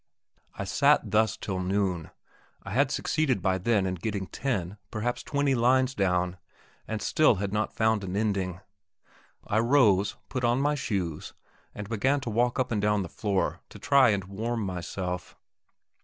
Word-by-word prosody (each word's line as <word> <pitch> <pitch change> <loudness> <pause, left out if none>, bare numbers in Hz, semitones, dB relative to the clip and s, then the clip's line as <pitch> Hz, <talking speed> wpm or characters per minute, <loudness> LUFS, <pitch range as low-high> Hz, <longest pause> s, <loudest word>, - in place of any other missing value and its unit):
I - - -4
sat 130 +2 +2
thus 110 +1 +2
till 95 -4 -4
noon; 95 -3 -1 0.5
I - - -8
had - - +2
succeeded 140 -8 0
by 95 +1 0
then 100 0 +2
in 95 - -1
getting 95 +2 -3
ten, 100 -6 -3
perhaps 120 +3 -2
twenty 140 -1 0
lines 130 +2 +3
down, 90 -3 0 0.5
and 110 -1 -3
still 155 -7 +4
I 95 - -5
had 100 0 -2
not 105 0 -1
found 110 -2 +2
an 95 0 -4
ending. 100 -4 -1 0.8
I 110 - +1
rose, 115 -6 +3
put 130 - -4
on 120 +2 +2
my 145 +2 +2
shoes, 95 - -3 0.4
and 105 -1 -6
began 130 +6 +1
to 120 - -4
walk 120 +2 +1
up 130 -2 0
and 105 -3 0
down 105 -1 +2
the 85 - -7
floor 100 0 -1
to - - -11
try 140 -3 +4
and 100 -2 +1
warm 110 +5 -3
myself. 90 0 -5
105 Hz, 170 wpm, -27 LUFS, 95-120 Hz, 0.8 s, still